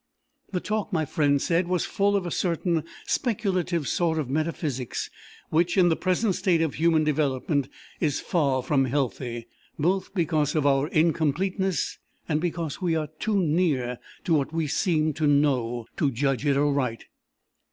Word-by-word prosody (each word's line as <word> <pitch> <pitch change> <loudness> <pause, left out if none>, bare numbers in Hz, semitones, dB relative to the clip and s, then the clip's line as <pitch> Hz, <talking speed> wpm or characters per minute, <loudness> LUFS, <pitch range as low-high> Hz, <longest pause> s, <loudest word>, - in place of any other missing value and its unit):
The 185 - 0
talk, 215 +2 -2
my 160 -4 +1
friend 145 -1 +2
said, 170 +4 +1
was 180 -2 0
full 200 +1 +1
of 195 -2 0
a 175 - -3
certain 170 -2 0 0.2
speculative 185 - 0
sort 165 -2 +1
of 140 -5 -2
metaphysics 150 -4 -2 0.4
which, 170 +4 +2
in 180 -2 +6
the 165 - +3
present 185 +4 +1
state 170 -3 +2
of 160 - -1
human 160 0 +3
development, 145 -2 0 0.3
is 150 -4 0
far 140 -8 0
from 135 -1 +2
healthy, 125 -3 -2 0.3
both 185 +5 0
because 155 -4 +1
of 150 -2 +1
our 140 0 +3
incompleteness, 170 +3 0 0.3
and 155 -1 0
because 170 -1 -3
we 170 -3 +1
are 155 -2 -2
too 215 -2 +1
near 150 -7 +1 0.2
to 170 - +1
what 145 -2 +1
we 165 -1 -1
seem 155 0 +1
to 155 +1 0
know, 130 -5 +2
to 145 - +2
judge 135 +2 0
it 140 -1 +3
aright. 140 -5 0
155 Hz, 160 wpm, -26 LUFS, 140-175 Hz, 0.4 s, in